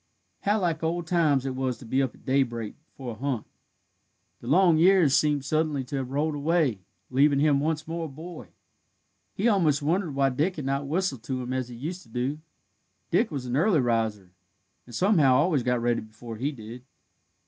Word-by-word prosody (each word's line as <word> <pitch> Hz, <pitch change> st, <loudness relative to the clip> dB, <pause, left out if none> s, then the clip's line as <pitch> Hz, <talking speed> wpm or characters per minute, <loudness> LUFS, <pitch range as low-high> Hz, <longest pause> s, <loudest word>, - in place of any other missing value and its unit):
How 210 Hz, +2 st, +1 dB
like 170 Hz, -4 st, -1 dB
old 170 Hz, +1 st, -1 dB
times 155 Hz, -6 st, +2 dB
it 130 Hz, -1 st, -3 dB
was 130 Hz, -2 st, -2 dB
to 120 Hz, -, -13 dB
be 130 Hz, +4 st, +1 dB
up 130 Hz, -3 st, -2 dB
at -, -, -22 dB
daybreak 120 Hz, -5 st, 0 dB, 0.2 s
for 130 Hz, -3 st, -6 dB
a 110 Hz, -, -10 dB
hunt! 130 Hz, -5 st, -2 dB, 0.9 s
The 120 Hz, -, -11 dB
long 170 Hz, +2 st, +4 dB
years 175 Hz, -5 st, +5 dB
seemed 145 Hz, -2 st, +2 dB
suddenly 155 Hz, -1 st, 0 dB
to 140 Hz, +3 st, -5 dB
have 130 Hz, -2 st, -3 dB
rolled 150 Hz, +3 st, 0 dB
away, 145 Hz, -, +1 dB, 0.3 s
leaving 140 Hz, +2 st, +4 dB
him 145 Hz, -1 st, +3 dB
once 155 Hz, +1 st, -1 dB
more 165 Hz, 0 st, -3 dB
a -, -, -4 dB
boy. 155 Hz, -, -9 dB, 0.9 s
He 210 Hz, -, +1 dB
almost 165 Hz, -10 st, +2 dB
wondered 165 Hz, -1 st, 0 dB
why 135 Hz, 0 st, +3 dB
Dick 155 Hz, +8 st, 0 dB
had 150 Hz, -, -5 dB
not 140 Hz, +1 st, -1 dB
whistled 160 Hz, -5 st, -1 dB
to 130 Hz, 0 st, -3 dB
him 125 Hz, +1 st, -4 dB
as 130 Hz, -2 st, -2 dB
he 120 Hz, -, -9 dB
used 165 Hz, +9 st, -5 dB
to 115 Hz, -, -19 dB
do. 125 Hz, +6 st, -2 dB, 0.7 s
Dick -, -, +3 dB
was 135 Hz, -4 st, -5 dB
an 125 Hz, 0 st, -2 dB
early 165 Hz, +3 st, +3 dB
riser, 110 Hz, -6 st, -1 dB, 0.6 s
and 120 Hz, -, -10 dB
somehow 160 Hz, -, +4 dB
always 150 Hz, 0 st, +3 dB
got 125 Hz, 0 st, 0 dB
ready 120 Hz, 0 st, 0 dB
before 110 Hz, +1 st, -10 dB
he 135 Hz, +6 st, -1 dB
did. 120 Hz, -1 st, -10 dB
140 Hz, 195 wpm, -26 LUFS, 125-160 Hz, 0.9 s, years